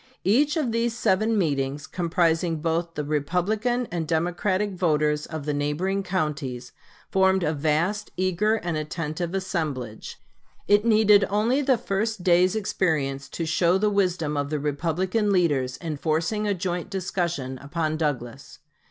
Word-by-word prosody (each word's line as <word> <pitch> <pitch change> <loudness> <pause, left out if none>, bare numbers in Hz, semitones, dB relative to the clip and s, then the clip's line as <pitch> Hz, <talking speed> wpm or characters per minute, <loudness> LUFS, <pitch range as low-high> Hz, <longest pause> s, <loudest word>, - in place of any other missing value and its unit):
Each 285 - +3
of 275 -7 0
these 230 0 0
seven 215 +2 +2
meetings, 140 -4 -1
comprising 165 0 +1
both 165 +2 -2
the 150 - -2
Republican 190 - 0
and 165 -3 -2
Democratic 180 +5 0
voters 150 -4 +1
of 155 -3 -6
the 150 - -1
neighboring 150 +7 -1
counties, 150 -9 -3 0.4
formed 190 -1 +3
a 155 - +1
vast, 160 +8 0
eager, 185 +4 +1
and 175 -6 -3
attentive 155 +3 -3
assemblage. 155 - -4 0.5
It 205 +2 +4
needed 215 -3 +5
only 225 +7 +2
the 265 -3 +3
first 215 -2 -2
day's 180 +2 +4
experience 145 -10 -1
to 165 - -4
show 170 +3 +2
the 210 +1 +1
wisdom 180 -7 0
of 145 0 -1
the 150 0 -1
Republican 175 +9 0
leaders 145 -9 +1
in 160 -4 -5
forcing 165 +8 0
a 205 - +1
joint 180 0 -3
discussion 170 -8 -3
upon 155 +3 -2
Douglas. 140 -4 -3
175 Hz, 145 wpm, -25 LUFS, 150-200 Hz, 0.5 s, needed